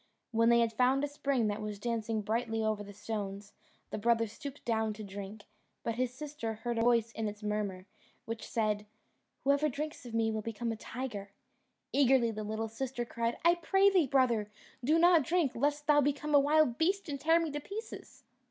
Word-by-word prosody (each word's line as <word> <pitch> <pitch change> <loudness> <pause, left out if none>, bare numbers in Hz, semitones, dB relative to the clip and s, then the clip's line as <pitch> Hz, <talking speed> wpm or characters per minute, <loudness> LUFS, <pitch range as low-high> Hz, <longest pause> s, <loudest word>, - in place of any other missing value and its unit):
When 230 0 +3
they 235 0 +5
had 230 -1 +1
found 255 +4 +3
a - - +1
spring 280 -4 0
that 210 0 -1
was 210 -1 -4
dancing 225 0 -2
brightly 225 +1 -1
over 215 -1 0
the 205 - -10
stones, 205 -1 -5 0.4
the - - -3
brother 230 +1 +3
stooped 275 +6 -9
down 220 -2 0
to 215 +1 -8
drink; 200 +1 -8 0.4
but 230 - -1
his 250 +1 -1
sister 260 -4 -5
heard 235 +1 -3
a - - +2
voice 230 -1 +3
in 225 -1 -3
its 210 +1 -7
murmur, 205 -3 -2 0.4
which 230 0 -5
said, 210 -2 0 0.6
"Whoever 280 +2 +3
drinks 300 +2 -5
of 230 - -6
me 225 -1 +2
will 220 0 -2
become 230 +2 -3
a - - -2
tiger." 220 -3 -6 0.6
Eagerly 265 -4 +4
the 215 -1 -5
little 220 +1 -3
sister 240 +2 -4
cried, 235 0 -2
"I 340 - +7
pray 385 +3 +3
thee, 360 -7 +3
brother, 240 -6 +2 0.3
do 305 +6 +4
not 345 -1 +6
drink, 320 -1 +1
lest 290 +4 0
thou 295 -1 +5
become 290 +2 -1
a 285 - +8
wild 290 -3 +3
beast 380 +4 +1
and 285 -2 -4
tear 325 +2 +4
me 330 -2 -2
to 295 - -3
pieces." 410 +9 -8
235 Hz, 200 wpm, -32 LUFS, 220-285 Hz, 0.6 s, a